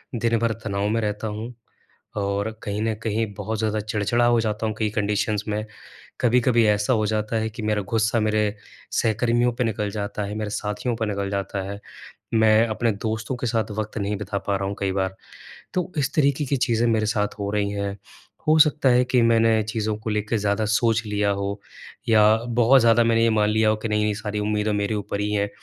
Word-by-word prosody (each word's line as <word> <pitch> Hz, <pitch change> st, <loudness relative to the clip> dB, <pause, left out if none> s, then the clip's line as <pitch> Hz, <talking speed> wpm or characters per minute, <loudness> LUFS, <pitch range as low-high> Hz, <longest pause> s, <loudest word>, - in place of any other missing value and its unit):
दिन 115 Hz, 0 st, +1 dB
भर 115 Hz, -1 st, +1 dB
तनाव 100 Hz, -1 st, -1 dB
में 115 Hz, +1 st, 0 dB
रहता 105 Hz, +1 st, -2 dB
हूँ 110 Hz, +4 st, -5 dB, 0.6 s
और 100 Hz, +2 st, -1 dB
कहीं 105 Hz, -1 st, -3 dB
न 110 Hz, 0 st, 0 dB
कहीं 110 Hz, 0 st, 0 dB
बहुत 110 Hz, -1 st, -3 dB
ज़्यादा 110 Hz, -1 st, 0 dB
चिड़चिड़ा 110 Hz, +3 st, 0 dB
हो 120 Hz, -1 st, +4 dB
जाता 110 Hz, 0 st, -2 dB
हूँ, 110 Hz, -, -3 dB
कई 110 Hz, -1 st, +1 dB
कंडीशंस 105 Hz, 0 st, 0 dB
में, 105 Hz, +1 st, -2 dB, 0.6 s
कभी-कभी 120 Hz, -1 st, +3 dB
ऐसा 105 Hz, +4 st, +2 dB
हो 110 Hz, -2 st, +1 dB
जाता 110 Hz, +1 st, -1 dB
है 110 Hz, 0 st, -1 dB
कि 110 Hz, -, -8 dB
मेरा 105 Hz, -1 st, 0 dB
गुस्सा 110 Hz, +1 st, +2 dB
मेरे 105 Hz, -1 st, +1 dB, 0.4 s
सहकर्मियों 120 Hz, +2 st, +1 dB
पे 125 Hz, -, -1 dB
निकल 105 Hz, -2 st, -1 dB
जाता 105 Hz, 0 st, -4 dB
है, 105 Hz, +1 st, -5 dB
मेरे 105 Hz, -1 st, -3 dB
साथियों 105 Hz, +3 st, -2 dB
पर 110 Hz, -, -1 dB
निकल 100 Hz, -1 st, -2 dB
जाता 100 Hz, 0 st, -2 dB
है, 100 Hz, -, -7 dB, 0.6 s
मैं 110 Hz, +1 st, +5 dB
अपने 115 Hz, +1 st, 0 dB
दोस्तों 110 Hz, +4 st, -3 dB
के 125 Hz, -, -4 dB
साथ 110 Hz, -3 st, -1 dB
वक़्त 110 Hz, +1 st, -3 dB
नहीं 100 Hz, +1 st, -2 dB
बिता 100 Hz, 0 st, -3 dB
पा 100 Hz, -1 st, +1 dB
रहा 95 Hz, 0 st, -2 dB
हूँ 100 Hz, -, -4 dB
कई 95 Hz, -1 st, 0 dB
बार। 95 Hz, -1 st, -1 dB, 0.6 s
तो 180 Hz, 0 st, -1 dB
इस 135 Hz, -, 0 dB
तरीके 140 Hz, -1 st, +2 dB
की 140 Hz, +1 st, 0 dB
चीज़ें 120 Hz, -2 st, +1 dB
मेरे 110 Hz, -1 st, +1 dB
साथ 105 Hz, -1 st, +1 dB
हो 100 Hz, 0 st, -2 dB
रही 100 Hz, -1 st, 0 dB
हैं, 100 Hz, -1 st, -3 dB, 0.5 s
हो 155 Hz, -, +5 dB
सकता 150 Hz, -3 st, +4 dB
है 125 Hz, +1 st, +4 dB
कि 125 Hz, 0 st, +2 dB
मैंने 115 Hz, -1 st, +4 dB
चीज़ों 110 Hz, 0 st, -2 dB
को 110 Hz, -, -5 dB
लेके 105 Hz, +1 st, -1 dB
ज़्यादा 100 Hz, +1 st, 0 dB
सोच 115 Hz, +1 st, +2 dB
लिया 105 Hz, -1 st, 0 dB
हो 100 Hz, +1 st, -2 dB, 0.5 s
या 110 Hz, -2 st, +5 dB, 0.4 s
बहुत 130 Hz, +3 st, +6 dB
ज़्यादा 115 Hz, 0 st, +5 dB
मैंने 115 Hz, 0 st, +3 dB
ये 115 Hz, -, +3 dB
मान 105 Hz, -1 st, +2 dB
लिया 110 Hz, 0 st, +2 dB
हो 110 Hz, -, +1 dB
कि 115 Hz, -, 0 dB
नहीं, 105 Hz, 0 st, +1 dB
नहीं 105 Hz, -1 st, 0 dB
सारी 105 Hz, 0 st, -4 dB
उम्मीदें 105 Hz, 0 st, 0 dB
मेरे 105 Hz, +1 st, -1 dB
ऊपर 100 Hz, 0 st, -3 dB
ही 105 Hz, 0 st, -1 dB
हैं, 100 Hz, -1 st, +1 dB
110 Hz, 215 wpm, -23 LUFS, 105-115 Hz, 0.6 s, बहुत